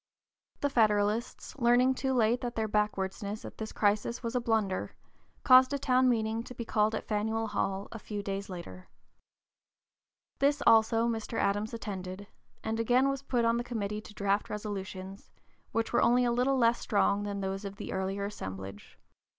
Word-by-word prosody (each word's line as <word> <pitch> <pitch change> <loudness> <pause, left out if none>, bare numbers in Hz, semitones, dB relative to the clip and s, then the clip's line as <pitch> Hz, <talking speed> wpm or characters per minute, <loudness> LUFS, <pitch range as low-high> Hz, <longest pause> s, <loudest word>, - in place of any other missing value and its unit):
The 285 - +1
Federalists, 215 0 +1
learning 245 +2 +4
too 265 +1 -2
late 240 -1 +2
that 240 -1 -4
their 220 -1 0
backwardness 210 0 -2
at - - -10
this 220 0 -4
crisis 210 +4 0
was 230 0 -3
a 250 - +2
blunder, 220 -5 -1 0.5
caused 255 +1 +7
a - - +1
town 255 -1 +3
meeting 225 -1 0
to 250 +2 -10
be 235 - -5
called 215 0 +1
at - - -5
Faneuil 220 +1 -1
Hall 195 -1 -2
a 225 - -7
few 205 -1 -5
days 195 0 -4
later. 185 0 -8 1.5
This 285 +1 +2
also 225 +1 +5
(p. 230 -1 0
052) 220 - -8
Mr. - - 0
Adams 205 +2 0
attended, 195 -2 -6 0.4
and 225 +1 -2
again 250 +4 +3
was 275 -1 -2
put 245 -4 0
on 230 0 +3
the 240 - -1
committee 210 -3 -3
to 215 - -13
draft 200 +1 0
resolutions, 195 -2 -6 0.4
which 225 +1 -1
were - - +4
only 245 +1 +4
a 240 - +2
little 255 +3 +2
less 235 -1 +3
strong 205 -1 +1
than 200 -1 -3
those 195 +1 -3
of 200 -1 -6
the - - -6
earlier 195 +1 -2
assemblage. 95 - -7
220 Hz, 180 wpm, -30 LUFS, 200-240 Hz, 1.5 s, caused